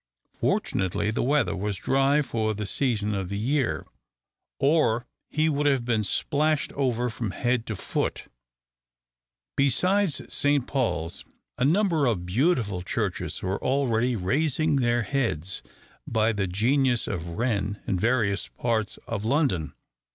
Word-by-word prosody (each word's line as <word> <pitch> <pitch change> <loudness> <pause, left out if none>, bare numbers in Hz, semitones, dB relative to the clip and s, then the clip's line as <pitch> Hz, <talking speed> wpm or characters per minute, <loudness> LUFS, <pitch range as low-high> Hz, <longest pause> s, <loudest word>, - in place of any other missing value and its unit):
Fortunately 95 +2 0
the - - -1
weather 140 -5 +2
was 100 0 -2
dry 135 - +2
for 110 -4 -1
the 105 0 -3
season 105 -2 0
of 95 -3 -3
the 100 - -3
year, 130 +4 0 0.7
or 135 -6 +2 0.2
he 155 +1 +1
would 145 -1 +1
have 135 -4 +2
been 115 -3 +1
splashed 150 +7 0
over 125 -3 0
from 115 -1 -3
head 120 +4 -1
to 110 - -3
foot. - - -2 1.3
Besides 180 - +3
Saint 145 -3 +2
Paul's, 115 - -2 0.4
a - - +2
number 165 -3 +3
of 95 -7 0
beautiful 110 - +1
churches 90 - -3
were 95 +2 -2
already 125 -2 +1
raising 145 - +1
their 120 -2 +2
heads 110 - -2 0.5
by 110 0 +2
the 100 -2 -1
genius 120 +6 +2
of 85 -3 -4
Wren 105 -4 -1
in 95 - 0
various 110 -2 +1
parts 110 -3 -2
of 100 - -3
London. 110 - +1
120 Hz, 135 wpm, -26 LUFS, 100-140 Hz, 1.3 s, Besides